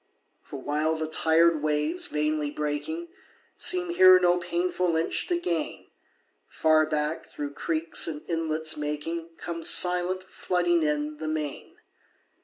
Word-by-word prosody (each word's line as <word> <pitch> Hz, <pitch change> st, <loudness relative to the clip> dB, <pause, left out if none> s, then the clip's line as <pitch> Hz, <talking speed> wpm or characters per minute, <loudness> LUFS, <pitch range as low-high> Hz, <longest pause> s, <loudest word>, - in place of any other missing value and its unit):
For 140 Hz, -, -9 dB
while 150 Hz, +4 st, -1 dB
the 160 Hz, 0 st, -3 dB
tired 160 Hz, 0 st, +3 dB
waves, 150 Hz, +3 st, 0 dB
vainly 150 Hz, 0 st, -1 dB
breaking, 150 Hz, -, -4 dB, 0.5 s
Seem 360 Hz, -1 st, +1 dB
here 185 Hz, -, +7 dB
no 180 Hz, 0 st, +3 dB
painful 175 Hz, 0 st, -1 dB
inch 160 Hz, +1 st, 0 dB
to 350 Hz, -, 0 dB
gain, 170 Hz, -, -3 dB, 0.6 s
Far 155 Hz, -1 st, +2 dB
back, 150 Hz, +1 st, -2 dB
through 145 Hz, -1 st, -6 dB
creeks 165 Hz, +2 st, 0 dB
and 150 Hz, -2 st, -6 dB
inlets 160 Hz, -1 st, -1 dB
making, 150 Hz, +3 st, -4 dB
Comes 170 Hz, -1 st, -2 dB
silent, 180 Hz, +2 st, +3 dB
flooding 175 Hz, -2 st, 0 dB
in, 150 Hz, 0 st, -1 dB
the 155 Hz, +1 st, -5 dB
main. 155 Hz, -2 st, -4 dB
160 Hz, 130 wpm, -26 LUFS, 150-175 Hz, 0.6 s, here